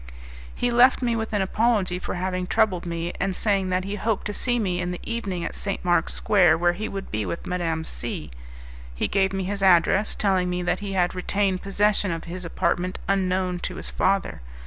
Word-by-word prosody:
He 245 - 0
left 250 +2 +5
me 235 -1 +1
with 225 -1 -3
an 205 -3 +1
apology 195 -3 +1
for - - -4
having 185 0 -2
troubled 195 -6 +1
me, 170 0 -3
and 195 -1 -1
saying 195 -3 +1
that 185 0 0
he 200 +2 -4
hoped 215 0 -1
to 210 - -3
see 245 +3 0
me 185 -5 -1
in 180 - -2
the 180 - -4
evening 200 -7 -3
at - - -4
St. 195 -2 -4
Mark's 175 -2 +2
Square, 175 -6 +4
where 175 +1 +2
he 215 +5 -4
would 195 -1 -6
be 110 0 -1
with 170 - -5
Madame 165 -3 -1
C, 95 - -5 0.6
he - - 0
gave 190 -1 +2
me 195 0 -2
his 200 +2 -3
address, 190 +2 +4
telling 190 -3 +1
me 180 0 -2
that 175 - 0
he 200 -1 -5
had 180 -2 +1
retained 190 0 0
possession 200 0 +1
of 165 -1 -3
his 180 +1 -7
apartment 175 +2 -1
unknown 185 -2 0
to 180 - -4
his - - -6
father. 195 - 0
185 Hz, 210 wpm, -24 LUFS, 180-205 Hz, 0.6 s, left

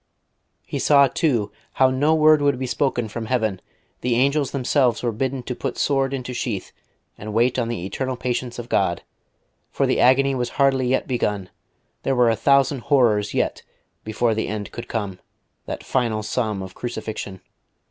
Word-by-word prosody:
He - - -4
saw, 140 -2 +6
too, 125 -6 0 0.2
how 130 -1 +4
no 145 +5 +2
word 155 -1 +5
would 140 -2 +2
be 130 - -3
spoken 125 -2 0
from 115 +1 -6
heaven; 110 -6 0 0.4
the 125 -1 0
angels 140 +3 +2
themselves 130 -3 +1
were 120 - +1
bidden 130 +3 -2
to 125 - -4
put - - -4
sword 135 -2 +1
into 125 -2 -4
sheath, 115 -5 -3 0.5
and 105 +1 -6
wait 120 +3 +2
on 120 - 0
the 115 -7 -4
eternal 130 +6 -3
patience 125 -1 -3
of 120 -1 -6
God, 95 -6 0 0.7
for - - 0
the - - +1
agony 135 +2 +4
was 125 -2 -1
hardly 135 -2 +3
yet 130 +1 0
begun; 105 -7 -2 0.5
there 135 - 0
were 120 -2 +4
a - - +1
thousand 140 +1 +3
horrors 120 -7 +2
yet - - 0 0.4
before 110 +2 0
the 110 - -2
end 105 -1 -5
could 120 - -7
come, 100 -5 -4 0.5
that - - -5
final 115 -4 0
sum 105 -4 -2
of 95 0 -9
crucifixion.... 110 -5 -5
125 Hz, 175 wpm, -22 LUFS, 110-135 Hz, 0.7 s, saw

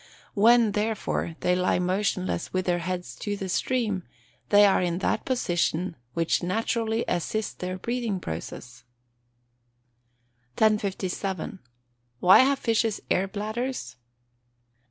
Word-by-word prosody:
When, 230 +1 +5
therefore, 210 -5 -2
they 180 0 +2
lie 180 0 +2
motionless 185 -1 -1
with 185 0 -1
their 175 -1 +1
heads 180 +1 -4
to 205 -1 -3
the 195 - -4
stream, 215 0 0 0.5
they 205 0 +7
are 195 - +4
in 175 -1 0
that 190 - -1
position 180 -7 0 0.2
which 165 -1 +1
naturally 225 +4 -1
assists 205 +5 -1
their 185 0 -5
breathing 235 -1 -2
process. 125 - -7 1.7
1057. 195 -3 0 0.6
_Why 180 +6 +7
have 275 +1 +4
fishes 225 -3 0
air 190 +2 +2
bladders? 215 - -4
195 Hz, 115 wpm, -26 LUFS, 180-220 Hz, 1.7 s, they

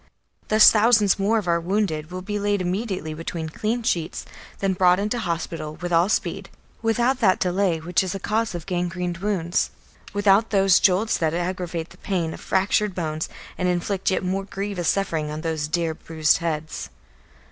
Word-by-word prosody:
Thus 215 0 +8
thousands 215 -3 +4
more 210 +3 +2
of 205 -5 -2
our 170 0 +2
wounded 170 -4 -1
will 185 0 -6
be 205 +1 -3
laid 205 0 +1
immediately 185 -3 -2
between 165 0 -5
clean 225 +8 -2
sheets, 175 -7 -1 0.3
then 195 -1 0
brought 180 -1 +4
into 210 +4 -1
hospital 165 -5 -3
with 175 +1 -4
all 170 +3 +4
speed, - - -1 0.3
without 240 +3 +1
that 190 -5 +4
delay 180 -2 +1
which 165 +2 +1
is 190 0 -3
a - - -4
cause 220 0 -1
of 165 -2 -6
gangrened 175 -1 -2
wounds, 185 -3 0 0.4
without 205 +2 +3
those 195 -2 +4
jolts 200 +4 +2
that 160 -1 0
aggravate 175 -1 -3
the - - -15
pain 170 -5 -2
of - - -10
fractured 195 +1 +1
bones 155 -3 -3 0.3
and 180 - +1
inflict 180 +2 0
yet 190 - 0
more 190 +2 -1
grievous 195 -4 -2
suffering 165 -6 0
on 155 +1 -5
those 160 -2 -2
dear 165 0 -1
bruised 160 -1 +1
heads. 155 -2 -3
185 Hz, 175 wpm, -23 LUFS, 165-205 Hz, 0.4 s, Thus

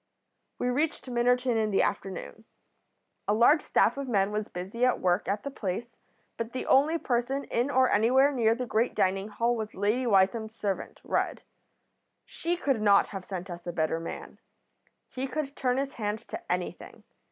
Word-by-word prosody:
"We - - -1
reached 295 +5 -1
Minnerton 245 0 +2
in 215 -1 +1
the 195 - +3
afternoon. 195 +3 -4 0.8
A 205 - +3
large 285 +8 +5
staff - - +2
of 275 -1 -4
men 200 -4 +1
was 210 0 -2
busy 190 +7 -5
at 255 0 +3
work 180 +2 +1
at 205 +1 -1
the 280 - -4
place, 230 +1 -5 0.4
but 230 0 -4
the 255 - -3
only 300 +5 +4
person 260 0 -1
in 240 +4 -1
or 260 -2 +4
anywhere 255 +7 +4
near 230 -4 +2
the 250 +1 -3
great 230 +1 0
dining 195 +2 +1
hall 235 +3 0
was 220 -1 -5
Lady 215 +6 0
Wytham's 220 +2 +2
servant, 200 -4 -4
Rudd. - - -1 0.8
She 345 +1 -3
could 275 -9 0
not 200 -2 +5
have 195 -3 -7
sent 185 -2 -5
us 175 -1 -8
a - - -1
better 160 -1 0
man. 165 - -8 0.7
He 260 +1 -4
could 280 0 -4
turn 250 -1 0
his 275 0 -2
hand 215 0 -4
to - - -6
anything. - - -4
230 Hz, 175 wpm, -28 LUFS, 200-255 Hz, 0.8 s, large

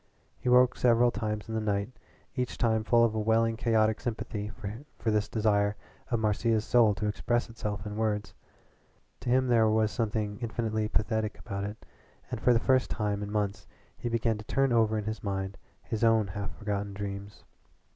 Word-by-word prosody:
He 125 - -1
woke 125 0 +5
several 120 0 +4
times 105 -2 -3
in 110 - -5
the 110 - 0
night, 105 +1 -1 0.4
each 125 -1 -2
time 110 -2 +2
full 115 +2 +4
of 115 -2 +3
a 110 - -1
welling 115 +1 +2
chaotic 110 -2 +2
sympathy 110 -3 -4 0.5
for 110 - 0
this 105 -1 +1
desire 105 -2 +2 0.3
of 120 - +1
Marcia's 110 +1 +1
soul 115 -4 +4
to 105 - -3
express 120 +3 0
itself 105 -2 -4
in 105 0 -5
words. 105 -2 -1 0.9
To - - -4
him 130 +1 +4
there 115 -3 +4
was 110 -1 +2
something 105 -2 -2
infinitely 110 -2 -1
pathetic 110 0 -1
about 100 0 -4
it, 105 +2 -7 0.5
and 120 -3 -4
for 125 - +4
the 115 - +4
first 130 +1 +2
time 105 -2 -1
in 105 0 -4
months 105 -2 -2 0.3
he 120 - -4
began 115 -1 0
to 105 - -9
turn 135 +1 +2
over 110 -2 +3
in 105 - -3
his 110 0 -4
mind 95 -1 -3 0.3
his 110 -1 -3
own 110 -3 +4
half 100 +2 -5
forgotten 100 -2 -3
dreams. 100 0 -6
110 Hz, 185 wpm, -29 LUFS, 105-115 Hz, 0.9 s, woke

